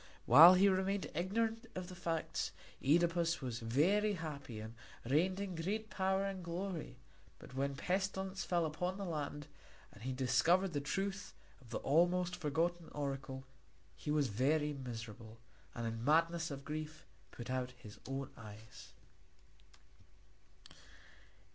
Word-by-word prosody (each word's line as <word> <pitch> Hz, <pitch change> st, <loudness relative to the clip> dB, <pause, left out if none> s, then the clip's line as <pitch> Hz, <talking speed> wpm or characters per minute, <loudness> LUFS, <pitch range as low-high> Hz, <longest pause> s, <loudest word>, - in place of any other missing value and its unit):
While 165 Hz, +9 st, +10 dB
he 195 Hz, +2 st, +6 dB
remained 190 Hz, -2 st, +1 dB
ignorant 225 Hz, +7 st, -1 dB
of 185 Hz, -1 st, -4 dB
the 185 Hz, -, -8 dB
facts 165 Hz, -2 st, -2 dB, 0.3 s
Œdipus 170 Hz, +2 st, +3 dB
was 125 Hz, -4 st, -4 dB
very 180 Hz, -, +2 dB
happy 145 Hz, -, -6 dB
and 110 Hz, +1 st, -7 dB, 0.3 s
reigned 175 Hz, +8 st, +2 dB
in 200 Hz, -2 st, -3 dB
great 205 Hz, +6 st, -3 dB
power 190 Hz, 0 st, +1 dB
and 195 Hz, -2 st, -4 dB
glory; 170 Hz, -6 st, -4 dB, 0.4 s
but -, -, -13 dB
when 140 Hz, +1 st, -1 dB
pestilence 190 Hz, +3 st, -1 dB
fell 175 Hz, -2 st, +1 dB
upon 180 Hz, +4 st, -2 dB
the 200 Hz, -, -4 dB
land 145 Hz, -3 st, -3 dB, 0.5 s
and 100 Hz, -, -15 dB
he 130 Hz, +3 st, -3 dB
discovered 135 Hz, +9 st, +3 dB
the 145 Hz, -, 0 dB
truth 195 Hz, +6 st, -3 dB, 0.3 s
of 125 Hz, -, -17 dB
the 115 Hz, -, -2 dB
almost 175 Hz, +4 st, +2 dB
forgotten 170 Hz, +1 st, -1 dB
oracle, 135 Hz, -2 st, -4 dB, 0.5 s
he -, -, -7 dB
was 150 Hz, -2 st, +3 dB
very 145 Hz, +7 st, +1 dB
miserable, 115 Hz, -4 st, -7 dB, 0.4 s
and 120 Hz, -, -3 dB
in 115 Hz, 0 st, -3 dB
the -, -, -6 dB
madness 165 Hz, +4 st, +3 dB
of 140 Hz, -1 st, -7 dB
grief 155 Hz, +1 st, -5 dB, 0.2 s
put 120 Hz, +1 st, -7 dB
out 130 Hz, -1 st, -2 dB
his 105 Hz, -3 st, -12 dB
own 135 Hz, 0 st, -4 dB
eyes. 110 Hz, 0 st, -12 dB
160 Hz, 140 wpm, -36 LUFS, 130-185 Hz, 0.5 s, While